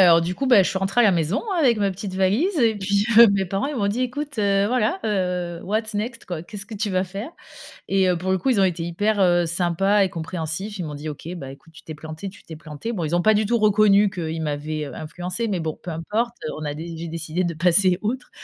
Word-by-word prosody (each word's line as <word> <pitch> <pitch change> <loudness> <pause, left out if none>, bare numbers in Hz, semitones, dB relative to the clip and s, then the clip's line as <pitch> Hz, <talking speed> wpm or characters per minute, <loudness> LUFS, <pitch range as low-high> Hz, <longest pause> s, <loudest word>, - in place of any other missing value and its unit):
alors 170 -3 +7
du 175 +2 -2
coup, 270 - -2
bah 230 -7 +7
je - - 0
suis - - -3
rentrée 195 +5 +1
à - - +6
la 210 - +6
maison 170 +1 0 0.2
avec 245 -8 +3
ma 200 -1 +1
petite 190 +1 -6
valise 205 - +1
et 225 -2 +3
puis 200 +1 0
heu, 235 -2 +10
mes 195 -1 +1
parents, 195 +5 -1
ils 290 - -4
m'ont 205 -5 0
dit: 235 +5 -1
«Écoute, 285 +1 -4
heu, 200 -1 +2
voilà, 250 - 0 0.6
what's 215 +2 -2
next? 230 +3 -4
Quoi, 175 -3 -5
qu'est-ce 200 +3 -9
que 220 - -8
tu 210 0 -2
vas 185 0 +1
faire?» 195 - -6 0.6
et 190 -1 +3
heu, 180 - +2
pour 185 +3 -3
le 190 - +2
coup, 270 - -2
ils 245 -6 +3
ont 195 - +5
été 175 -2 0
hyper, 205 +5 0
heu, 175 -2 +4
sympas 175 +4 +1
et 190 - +2
compréhensifs. 170 +4 -5
Ils 175 - -3
m'ont 150 - -6
dit: 150 +2 -6
«OK, 150 +2 -9
bah, 135 -5 -7
écoute 160 +4 -18
tu - - -14
t'es 155 - -8
plantée, 160 +5 -7
tu 195 - -17
t'es 160 - -10
plantée». 155 +8 -6
Bon 180 -7 -3
ils 155 +2 -1
ont 175 - +3
pas 215 +3 +4
du 215 +1 +2
tout 235 +3 +1
reconnu 210 -1 +4
qu'ils 165 -3 -4
m'avaient, 150 0 -3
heu, - - -8
influencée, 180 +8 -4
mais 195 -5 -1
bon 160 -1 -4
peu 180 - -6
importe. 215 +9 -2
Heu, - - -4
on 155 - -6
a 145 - -2
dé 165 +3 -7
j'ai 165 +1 -6
décidé 165 +2 -3
de 170 - -1
passer 180 +2 +3
outre 250 +4 -3
190 Hz, 265 wpm, -23 LUFS, 165-210 Hz, 0.6 s, heu